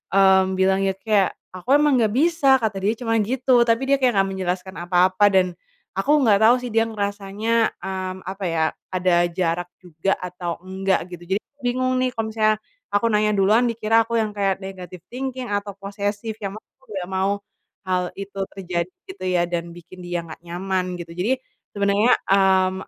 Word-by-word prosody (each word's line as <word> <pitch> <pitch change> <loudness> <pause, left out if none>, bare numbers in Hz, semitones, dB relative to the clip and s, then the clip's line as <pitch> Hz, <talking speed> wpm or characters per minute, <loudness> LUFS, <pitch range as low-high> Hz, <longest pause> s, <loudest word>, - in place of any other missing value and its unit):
mmm, 190 -1 +5
bilang 190 +1 +2
ya 190 - +1
kayak, 200 -1 +1 0.2
"aku 185 +9 -1
emang 295 -3 +4
nggak 215 -2 +2
bisa." 290 -1 +4
kata 215 -3 -1
dia 205 +4 +1
cuma 225 -1 +1
gitu, 245 +2 +3
tapi 230 +3 +2
dia 275 - +5
kayak 255 -2 +3
nggak 195 - -1
menjelaskan 190 0 -3
apa-apa 180 +3 +3
dan, 185 -1 +4 0.5
aku 260 +10 +2
nggak 215 -6 +5
tau 240 +3 +7
sih 245 - -5
dia 225 0 +2
ngerasanya, 210 +1 -1
mmm, 190 -1 -4
apa 190 +2 -6
ya, 165 -2 +1 0.3
ada 180 -1 +3
jarak 175 0 -1
juga 180 +2 -1
atau 180 -1 -5
enggak 190 -1 -1
gitu. 175 - -15
Jadi, - - -9 0.2
bingung 255 +1 +1
nih 255 -1 0
kalo 225 -1 -2
misalnya, 215 -1 +1 0.3
aku 205 +3 +2
nanya 210 -1 +2
duluan 210 +4 +4
dikira 225 -1 +2
aku 235 - -6
yang 215 - -1
kayak 195 -1 0
negatif 185 -2 -8
thinking 255 -1 -5
atau 205 0 -2
posesif, 205 +2 -4
yang 195 -2 -4
mana - - -13 0.2
aku 265 - -26
nggak 180 -1 -4
mau, 190 +1 +1 0.5
hal 185 -1 +1
itu 195 0 -7 0.2
terjadi 180 - -3 0.2
gitu 280 - -11
ya, 180 -1 +2
dan 170 -1 -3
bikin 175 +2 -13
dia 175 -1 -2
nggak 160 - -10
nyaman 180 +1 -2
gitu. 165 -1 -8
Jadi, 185 +9 0 0.4
sebenarnya, 200 +4 +3 0.2
mmm, 190 -1 +3
195 Hz, 180 wpm, -22 LUFS, 185-225 Hz, 0.5 s, tau